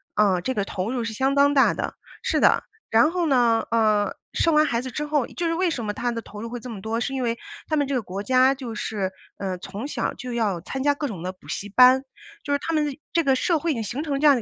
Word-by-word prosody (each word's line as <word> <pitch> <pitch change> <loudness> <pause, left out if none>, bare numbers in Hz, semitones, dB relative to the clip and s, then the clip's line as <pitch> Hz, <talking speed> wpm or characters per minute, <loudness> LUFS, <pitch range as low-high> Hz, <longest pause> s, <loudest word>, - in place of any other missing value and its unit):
呃， 195 -4 +3
这 260 - -1
个 205 - 0
投 195 +3 -3
入 245 -3 -1
是 225 - -3
相 265 +4 +1
当 285 +1 +4
大 270 - +5
的， - - -4 0.3
是 - - 0
的。 - - +4 0.3
然 265 +9 +5
后 350 -2 0
呢， 240 -4 +3
呃， 215 -3 +2 0.2
生 330 -2 +2
完 305 0 +6
孩 235 -4 0
子 260 - -6
之 300 +4 -3
后， 295 -4 0
就 345 - -4
是 330 - +1
为 355 +1 +1
什 240 -8 -3
么 210 - -2
他 245 +2 -1
的 230 -2 -4
投 210 0 -9
入 230 - -5
会 245 0 -5
这 245 0 -8
么 200 -3 -7
多？ 225 +2 -2
是 270 +3 -2
因 265 - -2
为 235 -1 0 0.3
他 310 - 0
们 290 -1 +2
这 275 - -3
个 250 - +1
国 195 +1 -6
家 260 +2 +4
就 250 -4 -6
是， 200 -3 -3 0.3
呃 185 -2 -3
从 205 +9 -6
小 - - -2
就 250 -2 -6
要 210 -7 0
参 265 +10 -5
加 290 +1 +3
各 290 0 -2
种 190 -8 -6
的 185 +1 -3
补 185 - -20
习 205 - -4
班， 255 +4 +7 0.4
就 285 - -4
是 285 - +3
他 330 +3 -3
们 300 -1 +2
的 285 +1 -6
这 335 0 +3
个 270 -2 +3
社 325 +4 +1
会 335 - -2
已 - - -5
经 225 - -3
形 245 +8 -4
成 280 -3 -2
这 305 - +1
样 290 - +8
的 240 - -1
250 Hz, 310 characters per minute, -24 LUFS, 215-285 Hz, 0.4 s, 样